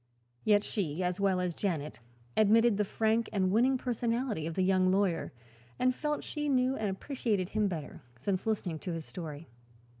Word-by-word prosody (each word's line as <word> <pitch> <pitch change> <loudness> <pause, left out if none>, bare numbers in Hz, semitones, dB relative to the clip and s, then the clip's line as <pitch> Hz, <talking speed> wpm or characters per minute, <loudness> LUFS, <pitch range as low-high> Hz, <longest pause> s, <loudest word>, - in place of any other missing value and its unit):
Yet 210 -1 +4
she, 185 -6 -2
as 180 +1 -1
well 195 -2 +2
as 180 -1 -1
Janet, 160 -8 -3 0.4
admitted 220 +1 +5
the 210 - +2
frank 220 +3 +1
and 190 -2 +1
winning 250 +5 +4
personality 235 - -1
of 165 - -4
the 185 - +2
young 185 0 +3
lawyer 190 -3 +1 0.5
and 255 0 +3
felt 300 +3 -2
she 295 -1 -3
knew 260 -1 +2
and 215 -4 -1
appreciated 205 -3 -1
him 215 -1 +1
better 160 -6 -5 0.2
since 185 - -2
listening 185 -7 -1
to 180 - -4
his 165 -2 -5
story. 160 -3 -7
200 Hz, 175 wpm, -31 LUFS, 180-230 Hz, 0.5 s, admitted